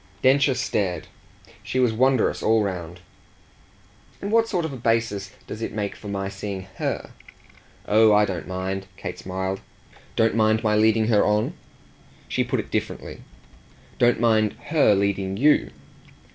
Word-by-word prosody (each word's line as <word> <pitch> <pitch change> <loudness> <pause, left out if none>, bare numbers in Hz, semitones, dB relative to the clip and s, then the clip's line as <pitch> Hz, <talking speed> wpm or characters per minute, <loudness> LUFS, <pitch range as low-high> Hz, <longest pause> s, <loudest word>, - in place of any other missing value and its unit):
Densher 135 +1 +4
stared 100 -7 -1 0.6
she 130 - -2
was 125 -3 +3
wondrous 130 +1 +2
all 110 0 +3
round. 90 -3 -5 1.2
"And 200 - -4
what 225 0 +4
sort 180 -7 -1
of 155 - -4
a - - -6
basis 115 -4 0 0.2
does 110 - -7
it - - -4
make 105 -1 -3
for 105 - -11
my 100 -1 -3
seeing 100 -1 -5 0.2
HER?" - - -3 0.8
"Oh 110 +1 +5
I 105 0 +5
don't 95 -4 -5
mind!" 95 +1 -4
Kate - - -6
smiled. 95 +1 -3 0.5
"Don't 115 0 +3
mind 110 0 +2
my 105 -1 +2
leading 110 +1 +3
her 105 -3 +4
on?" 105 +1 +1 0.7
She - - 0
put - - -1
it - - -6
differently. - - -4 0.8
"Don't 120 0 +4
mind 110 -2 +3 0.2
her 145 -10 +5
leading 100 -1 -1
YOU." 150 +6 +4
110 Hz, 150 wpm, -24 LUFS, 95-120 Hz, 1.2 s, Oh